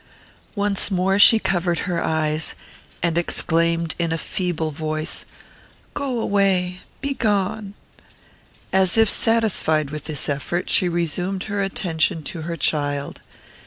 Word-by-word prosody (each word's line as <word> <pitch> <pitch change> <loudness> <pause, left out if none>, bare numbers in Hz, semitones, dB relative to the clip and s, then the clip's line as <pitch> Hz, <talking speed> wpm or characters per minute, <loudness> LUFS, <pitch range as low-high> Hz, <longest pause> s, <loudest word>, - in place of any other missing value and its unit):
Once 200 -1 +1
more 195 +1 +1
she 225 +2 +9
covered 175 -4 0
her 175 -3 -1
eyes, 155 0 0 0.5
and 170 0 +2
exclaimed, 170 -1 +2
in 170 -1 0
a 165 - 0
feeble 165 -2 -2
voice, 155 +1 -4 0.7
"Go 270 -4 -2
away! 190 -4 +1 0.2
begone!" 210 -6 -1 1.0
As 190 +1 +2
if 225 0 +5
satisfied 200 - +1
with 150 -1 -6
this 155 -3 -3
effort, 150 +5 -2
she 180 - +4
resumed 175 +3 -2
her 205 -1 -2
attention 175 -3 0
to 165 - -5
her 170 - -2
child. 145 -2 -1
175 Hz, 125 wpm, -22 LUFS, 160-200 Hz, 1.0 s, she